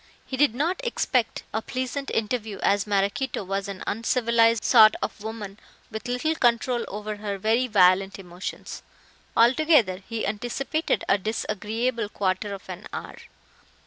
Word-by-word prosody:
He 265 - -5
did 270 -3 +3
not 345 - -1
expect 255 - 0
a 220 - 0
pleasant 260 +3 -4
interview, 220 -2 -2
as 200 0 +2
Maraquito 205 +5 0
was 195 +1 -3
an 195 -2 -6
uncivilized 230 0 +2
sort 215 -1 +7
of - - -4
woman 215 -2 -7 0.3
with 220 +2 -6
little 250 +6 0
control 240 -3 +1
over 210 +1 -5
her 205 -1 -4
very 225 +6 +1
violent 195 -2 +4
emotions. 180 -1 -7 0.6
Altogether, 245 - +4
he 230 -1 -2
anticipated 245 +9 -1
a 200 - +3
disagreeable 220 +2 -2
quarter 195 0 -1
of 195 -1 -8
an 185 +2 -8
hour. - - -7
220 Hz, 140 wpm, -25 LUFS, 200-250 Hz, 0.6 s, sort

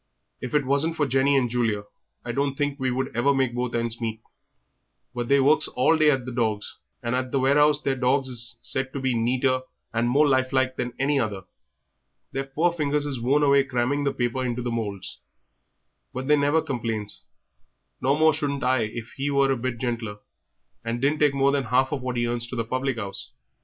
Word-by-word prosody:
If 125 +3 -4
it 145 -2 +2
wasn't 140 +5 +1
for 150 - +1
Jenny 135 +1 +3
and 125 -2 +2
Julia 115 -4 0 0.4
I 120 - -2
don't 140 +2 -1
think 145 0 -2
we 130 0 0
should 130 0 -2
ever 140 +4 +3
make 130 -3 +1
both 125 0 -2
ends 115 0 -1
meet; 110 -1 -3 0.9
but 120 -1 -3
they 140 +2 +4
works 145 +3 +4
all 130 +6 +2
day 155 -1 +4
at 135 -4 +1
the 130 - -5
dogs, 110 -4 -2 0.2
and 120 0 -1
at 130 0 -1
the - - +1
warehouse 145 +3 +4
their 135 - +1
dogs 130 +1 +1
is 120 -2 -1
said 130 0 -2
to 140 - -3
be 130 -1 0
neater 130 +3 +1 0.3
and 115 +1 +1
more 145 +4 +4
lifelike 130 -1 +1
than 125 -1 -3
any 140 +1 +1
other. 105 -6 -2 0.9
Their 135 0 -3
poor 160 +6 +1
fingers 150 -2 0
is 135 -5 -3
worn 140 +5 +2
away 140 -1 +5
cramming 135 +2 -1
the 140 - +1
paper 120 +1 -1
into 125 -1 -2
the 120 - -2
moulds; 105 -4 -4 1.0
but 130 - -4
they 150 - +5
never 145 +2 +2
complains, 115 -5 -4 0.7
no 135 +3 +2
more 160 0 +5
shouldn't 145 -2 -2
I 130 0 +3
if 110 +1 -7
he 140 +1 -1
was 140 -1 +3
a - - +2
bit 125 0 -3
gentler 115 -4 -3 0.7
and 115 +1 -2
didn't 145 +4 +1
take 145 -2 +3
more 140 0 +3
than 140 -2 0
half 130 +3 +2
of 145 -3 -2
what 125 -1 -3
he 120 - +1
earns 120 0 -2
to 125 - -6
the 115 -2 -2
public 130 +2 -2
'ouse. 100 -3 -5
130 Hz, 210 wpm, -25 LUFS, 120-140 Hz, 1.0 s, away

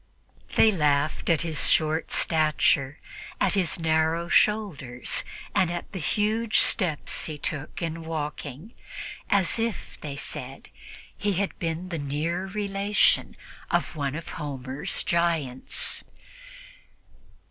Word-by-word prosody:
They 220 - +6
laughed 150 -4 +1
at 165 -2 +3
his 160 -3 0
short 155 0 +2
stature, 155 -3 +3 0.4
at - - +2
his 190 -2 +1
narrow 160 +1 +1
shoulders 160 - +1 0.3
and 180 - +3
at 175 0 -5
the 190 - -5
huge 215 +9 +1
steps 175 -9 +2
he 155 -2 -5
took 145 +2 -3
in 165 0 -3
walking, 155 - -5 0.6
as 200 +2 +2
if, 230 -1 -3
they 145 -2 -5
said, 135 -1 -7 0.5
he 205 -1 0
had 195 +2 -2
been 165 +2 -3
the 165 -3 -3
near 155 +6 -2
relation 200 0 +2 0.3
of - - 0
one 140 -2 -2
of 165 - -6
Homer's 135 -2 -3
giants. 165 -7 +1
165 Hz, 115 wpm, -26 LUFS, 145-190 Hz, 0.6 s, They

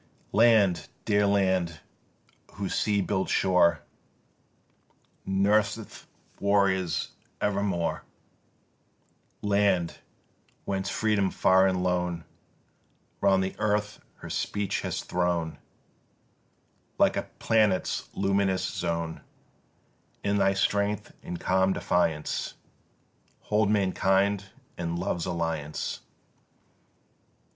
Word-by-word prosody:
Land, 105 -4 +4 0.2
dear 105 -1 +3
land, 95 -5 +1 0.7
whose 100 -1 -4
sea 105 -1 +1
built 95 0 -1
shore 90 -2 +3 1.4
Nurseth 100 +3 0 0.3
warriors 100 -3 +1 0.3
evermore, 100 -4 -1 1.4
Land, 100 -4 +1 0.7
whence 95 0 -2
Freedom 105 -3 +1
far 95 +1 +4
and 90 -1 0
lone 90 -2 -1 1.0
Round 95 -1 +4
the 95 - -4
earth 105 0 0 0.2
her - - -10
speech 100 -2 -2
has - - -3
thrown 85 -2 -1 1.4
Like - - +4
a - - -3
planet's 105 -4 +1
luminous 95 -1 +1
zone, 85 -1 -3 1.0
In 100 0 +1
thy 95 0 +3
strength 100 +1 0
and 90 - -6
calm 95 +1 +2
defiance 80 -5 -1 0.9
Hold 105 -1 +1
mankind 100 0 +2 0.3
in 85 -1 -2
love's 85 -1 -2
alliance! 80 -4 -3
95 Hz, 85 wpm, -27 LUFS, 90-100 Hz, 1.4 s, Land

